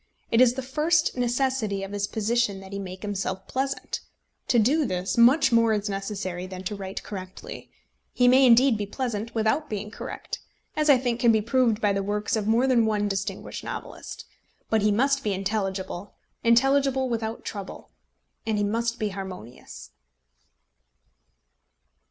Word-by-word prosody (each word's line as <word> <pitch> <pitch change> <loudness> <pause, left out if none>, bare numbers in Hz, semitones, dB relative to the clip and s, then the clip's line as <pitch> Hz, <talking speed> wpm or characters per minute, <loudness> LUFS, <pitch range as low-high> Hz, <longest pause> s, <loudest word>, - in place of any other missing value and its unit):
It 230 - +5
is 250 -1 +5
the 265 - -4
first 315 +5 +1
necessity 245 -5 0
of 195 - -6
his 200 0 -1
position 220 -2 0
that 195 0 -11
he 200 - -3
make 185 0 -7
himself 195 -2 -3
pleasant. 270 +1 -2 0.5
To 240 - +3
do 270 +8 +3
this, 185 -6 -2
much 250 +4 +5
more 230 -1 +4
is 210 0 -1
necessary 195 -2 -4
than 185 0 -8
to 205 +3 -3
write 195 -1 -6
correctly. 185 -2 -8 0.4
He 245 - +3
may 260 +1 +6
indeed 240 -1 +5
be 205 - -2
pleasant 230 -1 -4
without 230 +8 +1
being 210 -1 -4
correct, - - -6 0.4
as 305 0 +1
I 280 - +8
think 245 -2 -1
can 235 -1 +5
be 220 - +3
proved 230 0 +1
by 205 -1 +3
the 195 - 0
works 210 +2 -1
of 210 -2 -2
more 230 +4 +3
than 240 -4 +3
one 210 -1 +1
distinguished 195 -1 -4
novelist. - - -7 0.5
But 220 -1 +3
he 210 +1 +3
must 275 +6 +2
be 210 - 0
intelligible, 195 -1 -3 0.3
intelligible 265 +3 +3
without 225 -2 -3
trouble; 200 -2 -7 0.5
and 220 -1 -1
he 205 - +1
must 230 +3 -1
be 215 -2 -1
harmonious. 185 - -9
220 Hz, 165 wpm, -26 LUFS, 200-250 Hz, 0.5 s, I